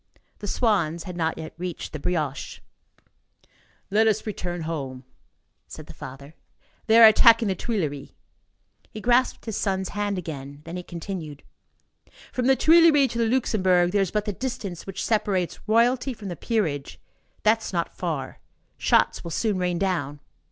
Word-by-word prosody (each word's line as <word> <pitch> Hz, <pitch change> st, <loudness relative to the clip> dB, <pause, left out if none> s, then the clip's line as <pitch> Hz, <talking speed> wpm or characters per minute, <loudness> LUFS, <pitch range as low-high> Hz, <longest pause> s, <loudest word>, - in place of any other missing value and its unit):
The 205 Hz, -, -6 dB
swans 190 Hz, -8 st, +1 dB
had 180 Hz, -, -7 dB
not 160 Hz, -2 st, -1 dB
yet 160 Hz, -1 st, -7 dB
reached 180 Hz, -4 st, -5 dB
the 155 Hz, -, -5 dB
brioche. 150 Hz, -4 st, -3 dB, 1.3 s
"Let 220 Hz, +2 st, +4 dB
us 215 Hz, -1 st, +1 dB
return 180 Hz, -5 st, -4 dB
home," 140 Hz, -6 st, -5 dB, 0.6 s
said -, -, -10 dB
the -, -, -12 dB
father, 140 Hz, +3 st, -10 dB, 0.5 s
"they 225 Hz, +1 st, +6 dB
are 230 Hz, -, +11 dB
attacking 225 Hz, 0 st, +6 dB
the -, -, +2 dB
Tuileries." 160 Hz, -, -3 dB, 0.8 s
He 215 Hz, -, -8 dB
grasped 245 Hz, +3 st, +1 dB
his 220 Hz, -3 st, -3 dB
son's 190 Hz, -2 st, -1 dB
hand 205 Hz, -1 st, -2 dB
again. 145 Hz, -4 st, -7 dB
Then 165 Hz, +1 st, -7 dB
he 180 Hz, -, -4 dB
continued: 170 Hz, -4 st, -7 dB, 0.9 s
"From 250 Hz, -1 st, -1 dB
the 270 Hz, -, +5 dB
Tuileries 315 Hz, -3 st, +5 dB
to 235 Hz, -, -3 dB
the 230 Hz, -, +2 dB
Luxembourg, 185 Hz, -8 st, +2 dB
there 200 Hz, 0 st, +2 dB
is 190 Hz, -, 0 dB
but 210 Hz, +2 st, -1 dB
the 205 Hz, -, -2 dB
distance 200 Hz, -7 st, -5 dB
which 195 Hz, -, -4 dB
separates 200 Hz, -5 st, 0 dB
Royalty 245 Hz, +4 st, +2 dB
from 205 Hz, -3 st, -8 dB
the 175 Hz, -, -4 dB
peerage; 165 Hz, -, -2 dB, 0.4 s
that -, -, +4 dB
is -, -, -6 dB
not -, -, -2 dB
far. -, -, -4 dB, 0.4 s
Shots -, -, +2 dB
will 170 Hz, -, -6 dB
soon 200 Hz, +3 st, -1 dB
rain 180 Hz, -1 st, 0 dB
down." 170 Hz, -7 st, -1 dB
190 Hz, 160 wpm, -25 LUFS, 165-220 Hz, 1.3 s, are